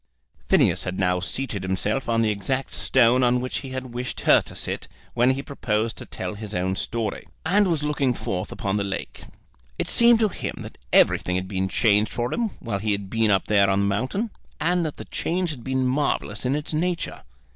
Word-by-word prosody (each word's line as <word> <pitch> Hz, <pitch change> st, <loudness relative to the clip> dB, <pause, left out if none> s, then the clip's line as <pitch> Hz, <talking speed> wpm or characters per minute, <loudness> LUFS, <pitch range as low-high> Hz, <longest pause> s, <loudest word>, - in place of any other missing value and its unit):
Phineas -, -, +4 dB
had 95 Hz, 0 st, -4 dB
now 90 Hz, -1 st, +2 dB
seated 100 Hz, +3 st, -3 dB
himself 100 Hz, +7 st, -1 dB
on 115 Hz, 0 st, +3 dB
the 110 Hz, -, +2 dB
exact 130 Hz, +6 st, -2 dB
stone 125 Hz, 0 st, +4 dB
on 125 Hz, 0 st, +3 dB
which 130 Hz, +1 st, -3 dB
he 135 Hz, -, -8 dB
had 130 Hz, -1 st, -6 dB
wished 125 Hz, +1 st, -4 dB
her -, -, +6 dB
to -, -, -10 dB
sit -, -, -2 dB, 0.3 s
when 120 Hz, +1 st, +3 dB
he 135 Hz, +1 st, 0 dB
proposed 110 Hz, -5 st, -1 dB
to -, -, -7 dB
tell 95 Hz, +1 st, -5 dB
his 105 Hz, 0 st, -7 dB
own 95 Hz, +1 st, 0 dB
story, 110 Hz, +1 st, -3 dB, 0.2 s
and 200 Hz, +5 st, +4 dB
was 165 Hz, -4 st, 0 dB
looking 145 Hz, -3 st, +1 dB
forth 100 Hz, -6 st, -3 dB
upon 100 Hz, +1 st, -2 dB
the 100 Hz, -, 0 dB
lake. 100 Hz, -1 st, -5 dB, 0.5 s
It -, -, -2 dB
seemed 235 Hz, 0 st, +6 dB
to 215 Hz, -, +4 dB
him -, -, -5 dB
that -, -, -10 dB
everything 90 Hz, -, +4 dB
had 95 Hz, 0 st, -2 dB
been 95 Hz, -1 st, -1 dB
changed 105 Hz, +1 st, +3 dB
for 120 Hz, +1 st, -2 dB
him 235 Hz, -2 st, 0 dB
while 105 Hz, -4 st, -3 dB
he 105 Hz, +1 st, 0 dB
had 100 Hz, -1 st, -5 dB
been 115 Hz, -1 st, +2 dB
up 95 Hz, -2 st, +3 dB
there 100 Hz, -2 st, +4 dB
upon 95 Hz, 0 st, +2 dB
the -, -, +2 dB
mountain, 130 Hz, -, -1 dB, 0.3 s
and 175 Hz, +3 st, +1 dB
that 150 Hz, -, -7 dB
the -, -, -8 dB
change 175 Hz, 0 st, -1 dB
had 130 Hz, -6 st, -8 dB
been 130 Hz, 0 st, 0 dB
marvellous 130 Hz, -4 st, 0 dB
in 135 Hz, -, +1 dB
its 150 Hz, +1 st, -4 dB
nature. 175 Hz, +2 st, -1 dB
120 Hz, 210 wpm, -24 LUFS, 100-135 Hz, 0.5 s, her